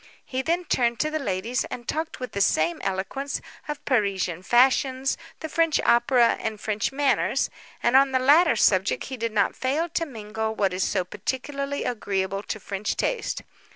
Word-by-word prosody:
He 260 0 -2
then 340 +5 0
turned 235 -6 +1
to 305 - 0
the 310 - -1
ladies, 225 0 -1
and 240 -1 -8
talked 320 +1 -3
with 250 -3 -5
the 200 - -2
same 170 -2 +2
eloquence, 195 +9 -3 0.3
of 295 -1 -5
Parisian 195 - 0
fashions, 260 +4 +3 0.3
the 315 - -3
French 330 0 +2
opera, 240 0 +4
and 220 -1 -3
French 215 +2 -1
manners; 280 0 +1 0.3
and 240 +2 +3
on 270 0 +6
the 260 - +3
latter 290 +3 +5
subject 195 -2 +2
he 260 - -5
did 230 -1 -2
not 215 - +1
fail 285 +6 0
to 330 0 -1
mingle 220 -3 -4
what 195 -3 +1
is 185 0 0
so 185 -3 0
particularly 275 +8 -3
agreeable 195 -4 -2
to 215 - -5
French 200 +1 -3
taste. - - -1
240 Hz, 175 wpm, -25 LUFS, 205-280 Hz, 0.3 s, on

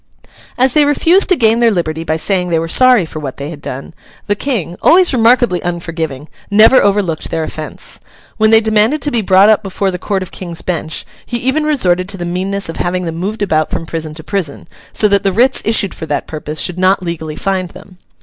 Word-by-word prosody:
As 255 0 +2
they 300 - +4
refused 330 +7 +3
to 370 - +4
gain 230 -4 +3
their 235 -1 +4
liberty 165 -5 -2
by 160 -1 -1
saying 180 +2 0
they 165 - +1
were 165 +1 -2
sorry 250 +1 +4
for 155 -1 -8
what 135 -4 -6
they 140 +3 -6
had 150 -3 -10
done, 135 +5 -7 0.3
the 205 - +1
King, 205 - -2
always 355 -2 +5
remarkably 235 -5 +3
unforgiving, 165 -4 -4 0.2
never 215 +5 +6
overlooked 195 -6 0
their 160 - -2
offence. 155 -1 -6 0.4
When 220 0 +3
they 225 0 +6
demanded 220 +6 +2
to 290 - -1
be 235 - +1
brought 190 0 +5
up 215 -1 +4
before 195 -1 -2
the 180 - -5
court 195 0 -2
of 185 - -11
King's 170 -3 -7
Bench, 160 -3 -3 0.2
he 240 - -3
even 265 +6 0
resorted 185 -11 +1
to 200 - -2
the 175 - -5
meanness 190 +3 -2
of 165 - -6
having 180 +1 -2
them 165 -1 -4
moved 205 +4 -3
about 155 -5 0
from 165 - -4
prison 160 -2 -5
to 160 - -7
prison, 180 -8 -3 0.2
so 210 - +2
that 200 -1 +2
the 195 - 0
writs 250 +7 +3
issued 210 -4 +1
for 160 - -7
that 145 - -2
purpose 155 0 -6
should 180 0 -1
not 185 +1 +2
legally 160 -3 -5
find 190 -1 -2
them. 185 0 -15
185 Hz, 220 wpm, -14 LUFS, 165-220 Hz, 0.4 s, never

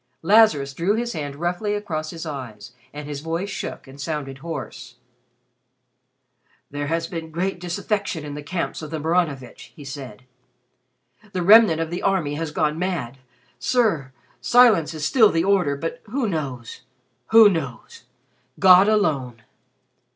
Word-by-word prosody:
Lazarus 170 -8 +4
drew 175 +8 0
his 235 +1 -2
hand 145 -2 -5
roughly 180 +6 -2
across 160 -7 -4
his 165 0 -7
eyes 120 -9 -8 0.2
and 145 0 -8
his 145 -1 -5
voice 165 +5 -3
shook - - -6
and 135 +2 -11
sounded 135 -2 -5
hoarse. 135 -6 -7 1.8
"There 145 0 -4
has 165 +2 -1
been 165 -2 -6
great 180 +3 -3
disaffection 180 -1 -3
in 145 - -6
the 150 - -6
camps 165 +4 -4
of 155 - -7
the 160 - -4
Maranovitch," 150 -6 -2
he 145 -4 -12
said. 135 -6 -9 1.1
"The 180 -2 -1
remnant 205 -4 +7
of 165 0 -3
the 175 - -4
army 185 -7 0
has 160 +1 -3
gone 150 +1 -1
mad. 155 -9 -3 0.4
Sir, 205 - +1 0.3
silence 225 -11 +4
is 155 -1 -3
still 220 +4 +5
the 165 0 0
order, 185 -7 +2
but 165 - -5
who 240 +3 -2
knows 135 - -5 0.5
who 225 -1 +8
knows? 165 - -4 0.5
God 190 +1 +7
alone." 135 - 0
165 Hz, 145 wpm, -22 LUFS, 145-195 Hz, 1.8 s, who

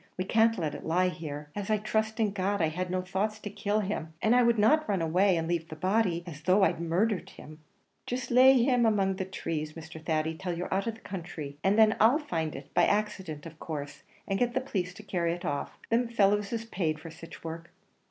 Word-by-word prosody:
We 185 - 0
can't 225 +3 +3
let 155 -5 -2
it - - -7
lie 180 +3 +2
here. 150 -4 -7
As 205 0 -4
I 215 - +3
trust 220 +1 -1
in 215 -2 +2
God, 200 +1 -1
I 160 -2 +2
had 180 +3 -3
no 185 0 -1
thoughts 195 +3 -1
to 205 -1 -7
kill 205 +1 0
him! 175 -5 -4
and 220 +5 +3
I 250 - +6
would 235 -1 +3
not 305 +9 +3
run 200 -2 +1
away, 180 +3 +3
and 165 0 -2
lave 165 -1 -2
the 155 - -7
body 185 +1 +1
here, - - -19
as 155 -4 -9
though 185 +4 +4
I'd 170 -3 +2
murdhered 180 +5 0
him." 155 +1 -12 0.5
"Jist 245 0 -3
lay 260 +2 +8
him 250 -1 +3
asy - - +5
among 195 -3 +1
the 190 - -2
trees, 155 -5 -4
Mr. 160 0 -10
Thady, 160 0 0
till 175 +1 -4
you're 180 - -3
out 195 +3 0
of 225 - -2
the 225 - -17
counthry; 165 -6 -7
and 195 +2 +3
then 220 0 +5
I'll 230 +6 +6
find 165 - -3
it, 135 +1 -10
by - - +5
accident 195 -8 -2
in 165 - -8
course, 145 -3 -6 0.3
and 195 -1 0
get 245 0 +1
the 260 - +2
police 185 -8 -3
to 215 - -11
carry 170 -4 -1
it 175 - -7
off. 145 0 -3
Thim 235 +1 +3
fellows 205 -3 +2
is 230 -1 -3
paid 165 -8 -2
for 160 +1 -9
sich 165 +1 -12
work." 165 0 -7
190 Hz, 240 wpm, -29 LUFS, 165-215 Hz, 0.5 s, lay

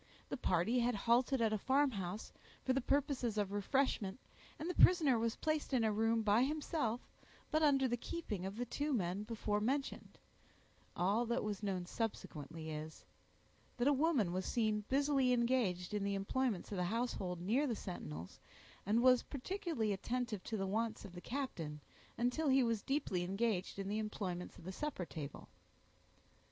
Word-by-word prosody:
The - - -2
party 215 +2 +2
had 240 0 +2
halted 240 +5 +3
at 220 -1 +2
a 215 - 0
farmhouse 220 -8 0 0.3
for 260 - +3
the 270 - +1
purposes 260 -4 0
of 205 -2 0
refreshment, 205 -1 0 0.4
and 315 - -4
the 360 - -1
prisoner 305 -10 +6
was 230 0 0
placed 310 -3 -1
in 240 - +3
a 220 - +3
room 225 +1 +2
by 210 +2 +4
himself, 285 -4 0 0.5
but 310 - +3
under 275 -3 +4
the 240 0 0
keeping 220 - -4
of 195 +2 -4
the 245 - -1
two 290 +5 -1
men 190 -3 0
before 210 -1 -1
mentioned; 270 +5 -2 0.8
all 205 +7 +2
that 235 +2 0
was 210 -2 -3
known 190 -4 -1
subsequently 165 -7 -4
is, 155 +1 -7 0.7
that 245 +2 +2
a 290 - +6
woman 270 - +2
was 185 +1 -1
seen 215 -3 +1
busily 275 -2 +3
engaged 235 -8 +1
in 205 -1 0
the 200 0 0
employments 210 +1 -1
of 200 - -2
the 180 - +1
household 195 -4 -2
near 235 +12 +2
the 235 - 0
sentinels, 85 - -7 0.5
and 225 +3 +3
was 255 -1 +7
particularly 290 - -2
attentive 235 0 -2
to 220 - -2
the 195 - -1
wants 220 +3 -1
of 190 - -10
the 175 - -8
captain, 180 - -4 0.4
until 250 +6 +1
he 265 0 +5
was 230 -3 +1
deeply 270 -10 0
engaged 195 +1 -1
in 195 -1 -3
the 210 +2 -1
employments 190 -5 -4
of - - -13
the 185 - -5
supper 260 -4 -3
table. 145 -4 -7
225 Hz, 170 wpm, -37 LUFS, 195-260 Hz, 0.8 s, was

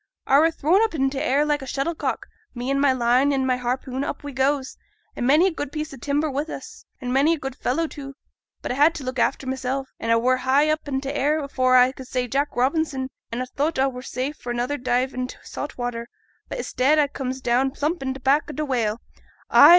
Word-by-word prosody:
I 275 - +5
were 325 +2 +5
thrown 330 +5 +2
up 445 -7 0
in 270 -2 +1
t' 270 - -3
air 280 +3 +2
like 295 -1 +1
a 265 - -7
shuttlecock, 285 +6 -2 0.3
me 245 +2 -2
an' 275 - +1
my 280 -1 +4
line 255 +2 +3
an' 270 -1 +1
my 255 -1 +2
harpoon 255 +2 -2
up - - -4
we 285 - -5
goes, 265 0 0 0.4
an' 245 - -1
many 305 +6 +6
a 385 - +3
good 290 -4 -4
piece 305 -1 -4
o' - - -9
timber 285 +5 0
wi' 280 -1 -1
us, - - -9
an' 250 -1 -3
many 290 +5 +4
a - - -9
good 270 -3 -5
fellow 295 +4 0
too; 275 -3 -8 0.5
but - - -2
a - - +1
had 295 +5 +4
t' 285 - -6
look 255 0 -3
after 270 - +1
mysel', 265 +1 -2
an 230 - -3
a 230 - +5
were 255 +2 +3
up - - -8
high 280 +4 +3
i' - - +4 0.2
t' 270 0 -5
air, 290 +2 +2
afore 255 -2 +2
I 250 +1 +6
could 260 -1 -11
say 250 -1 -1
Jack 280 +4 -1
Robinson, 265 0 0 0.2
an' 235 +2 -2
a - - -2
thowt 290 +5 -1
a 265 +1 +3
were 250 -1 -7
safe 260 +3 -4
for 245 - -8
another 245 +4 -1
dive 255 +1 0
int' 255 0 -4
saut 290 - -6
water; 240 -1 -3 0.4
but - - -4
i'stead 275 +5 +2
a 295 -1 +4
comes 265 -2 -4
down 255 +1 +2
plump 300 +5 -2
on 265 -1 -2
t' - - -8
back 280 +4 +2
o' - - -5
t' 305 - -2
whale. 235 -5 -1 0.5
Ay! 290 - +9
270 Hz, 245 wpm, -24 LUFS, 255-290 Hz, 0.5 s, Ay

